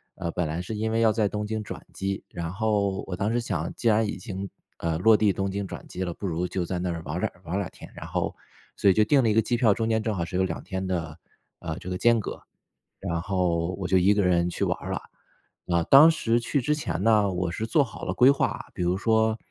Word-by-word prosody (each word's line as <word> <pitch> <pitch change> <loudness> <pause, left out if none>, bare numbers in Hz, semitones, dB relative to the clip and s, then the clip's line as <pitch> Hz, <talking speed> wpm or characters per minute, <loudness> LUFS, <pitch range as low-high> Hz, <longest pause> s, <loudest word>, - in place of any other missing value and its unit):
呃， 85 -3 -4
本 90 -2 -1
来 80 +3 -3
是 100 +5 -5
因 110 +1 -1
为 115 +1 +1
要 110 -1 +5
在 110 -1 +1
东 105 +1 -3
京 110 0 -3
转 - - -8
机， 95 0 -3
然 85 -2 -5
后 100 -1 0
我 90 - -3
当 100 +4 -1
时 120 - +1
想， 90 -8 -3
既 120 - -2
然 110 0 +4
已 - - -4
经， 100 -3 -6 0.3
呃， 80 -1 -1
落 110 +6 +6
地 105 -2 +3
东 95 0 -2
京 100 0 -3
转 - - -8
机 95 - -4
了， 85 - -3
不 100 - -7
如 90 +1 -1
就 90 0 -2
在 90 +1 -3
那 90 0 -1
儿 85 -1 -4
玩 - - -3
儿 - - -2
2 - - 0
玩 85 - -4
儿 - - +1
2 95 -2 -3
天， - - -13
然 - - -8
后 - - -2 0.4
所 100 - +4
以 - - +6
就 105 +3 +4
定 135 +5 +4
了 115 - +3
一 - - +3
个 110 - +4
机 120 +2 0
票， 115 -4 +4
中 115 +2 -1
间 110 -1 +2
正 110 -1 -1
好 85 - -1
是 85 - -7
有 95 - +2
2 90 -3 -3
天 95 0 -4
的， 80 -4 -3 0.4
呃， 80 -2 -5
这 90 - -8
个 90 - -2
间 115 +3 +4
隔， 105 - -6 0.6
然 85 -1 -2
后 85 -2 0
我 95 - -2
就 95 +1 +3
一 95 +3 +4
个 105 -1 +2
人 90 -1 +2
去 - - -3
玩 - - 0
儿 - - -6
了。 - - -2 0.7
啊， 85 -1 +2
当 145 - +8
时 120 -7 +1
去 130 +5 0
之 150 +5 +1
前 145 - -3
呢， 105 -3 +4
我 90 -1 -1
是 110 +6 -3
做 145 +6 +3
好 115 - -11
了 - - -2
规 125 - +6
划， 140 - 0
比 - - -3
如 90 +1 +1
说， 110 +1 +2
100 Hz, 285 characters per minute, -26 LUFS, 90-110 Hz, 0.7 s, 当